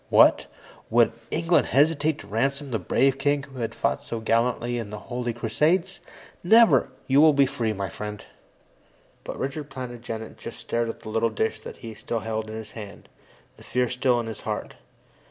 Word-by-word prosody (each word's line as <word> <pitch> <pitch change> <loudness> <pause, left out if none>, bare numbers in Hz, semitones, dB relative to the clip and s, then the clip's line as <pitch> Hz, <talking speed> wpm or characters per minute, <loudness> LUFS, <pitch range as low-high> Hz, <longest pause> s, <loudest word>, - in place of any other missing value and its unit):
"What? - - +6 0.4
Would - - +4 0.2
England 165 +2 +2
hesitate 150 +1 +3
to 100 - -13
ransom 135 +6 -1
the 110 - 0
brave 135 +8 +2
king 145 0 +1
who 135 -2 -11
has 115 - -1
fought - - 0
so 115 - -4
gallantly 120 +1 +1
in 110 -3 -5
the 105 - -6
Holy 120 +2 -4
Crusades? 155 - 0 0.4
Never! 225 +5 +6 0.2
You 135 +2 +5
will 155 -1 +7
be 140 -1 +5
free, 115 -4 -1
my 100 -2 -3
friend." 105 +3 -7 1.0
But - - -6
Richard 140 +2 -4
Plantagenet 120 -4 -7
just - - -8
stared 115 0 -1
at - - -7
the 110 - -8
little 115 +1 +1
dish 110 0 -1
that - - -9
he 115 -1 -8
still 110 +1 -4
held 110 0 -3
in 110 - -6
his 110 -1 -7
hand, 105 -3 -10 0.5
the - - -15
fear 125 0 0
still 125 0 +1
in 120 - -3
his 110 -1 -6
heart. - - -4
120 Hz, 185 wpm, -25 LUFS, 110-140 Hz, 1.0 s, will